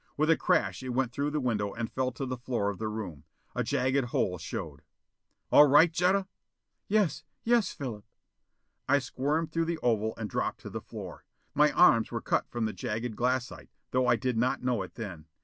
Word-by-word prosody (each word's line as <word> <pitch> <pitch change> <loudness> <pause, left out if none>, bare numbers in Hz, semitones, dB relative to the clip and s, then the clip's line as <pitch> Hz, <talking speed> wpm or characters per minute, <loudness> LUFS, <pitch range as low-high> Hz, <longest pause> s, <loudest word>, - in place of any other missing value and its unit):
With 155 +2 +3
a - - +6
crash - - +1
it 130 - -6
went 125 -1 0
through 140 +4 -1
the 150 0 -1
window 105 -6 -1
and 115 0 -4
fell 130 +2 -1
to 135 +3 -4
the 130 0 -3
floor 120 -5 -1
of 100 - -10
the 110 - -2
room. 105 -10 -5 0.3
A - - -1
jagged 130 +1 +1
hole 90 -6 -1
showed. 80 - -6 0.7
"All 150 - +8
right, 155 +4 +6
Jetta?" 185 +3 +2 0.6
"Yes! 195 -7 +1 0.2
Yes, 235 -2 +3
Philip." 115 -7 -6 0.9
I 140 - +6
squirmed 145 +4 -1
through 165 +1 0
the 170 0 -2
oval 110 -2 +1
and 110 - -3
dropped - - -2
to - - -8
the - - -5
floor. - - -9 0.3
My 150 +1 +4
arms 120 -11 +5
were - - -3
cut - - -1
from 120 -2 -2
the 110 - -2
jagged 110 +1 -3
glassite, 125 +1 -1 0.2
though 130 0 +2
I 120 - +5
did 120 0 -1
not 125 +1 0
know 125 -4 +1
it 95 - -8
then. 90 -9 -7
125 Hz, 200 wpm, -29 LUFS, 110-150 Hz, 0.9 s, All